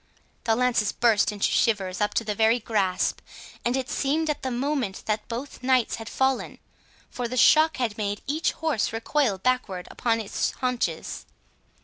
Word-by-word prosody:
The 225 -1 +3
lances 240 -4 +2
burst 225 -3 +3
into 205 -1 0
shivers 195 -4 +1
up 210 - 0
to - - +2
the 210 -1 -2
very 220 +3 +3
grasp, 200 -5 0 0.4
and 240 +2 +1
it 260 -1 -2
seemed 305 +3 0
at 295 - -5
the 260 - -2
moment 255 -4 -2
that 215 0 -2
both 245 +4 -6
knights 255 -2 +2
had 225 0 -7
fallen, 265 -1 0 0.5
for 245 -1 -3
the 255 +2 -4
shock 315 +5 +5
had 225 -4 -2
made 205 0 -2
each 310 +5 0
horse 310 -11 -1
recoil 225 -1 0
backwards 195 -5 -1
upon 230 -1 0
its 215 -3 -2
haunches. 250 -1 -2
235 Hz, 165 wpm, -25 LUFS, 210-260 Hz, 0.5 s, shock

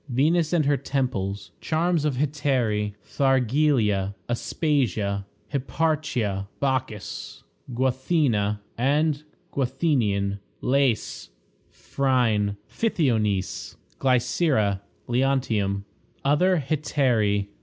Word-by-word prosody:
Venus 155 +6 +2
and 165 -4 +2
her 140 0 +3
Temples. 105 -8 -2
Charms 165 -1 +1
of 145 -4 +1
Hetairæ. 125 -7 0
Thargelia. 125 -7 +2
Aspasia. 115 - 0 0.3
Hipparchia. 135 -9 -1
Bacchis. 130 -6 -3 0.3
Guathena 125 -5 +1 0.2
and 145 +3 +2 0.3
Guathenion. 120 -8 0 0.2
Lais. 130 -3 0 0.4
Phryne. 115 -7 0
Pythionice. 110 - 0 0.2
Glycera. 125 - +2 0.3
Leontium. 120 -6 +1 0.4
Other 180 +6 +4
Hetairæ. 120 -10 +1
130 Hz, 70 wpm, -25 LUFS, 105-145 Hz, 0.4 s, Other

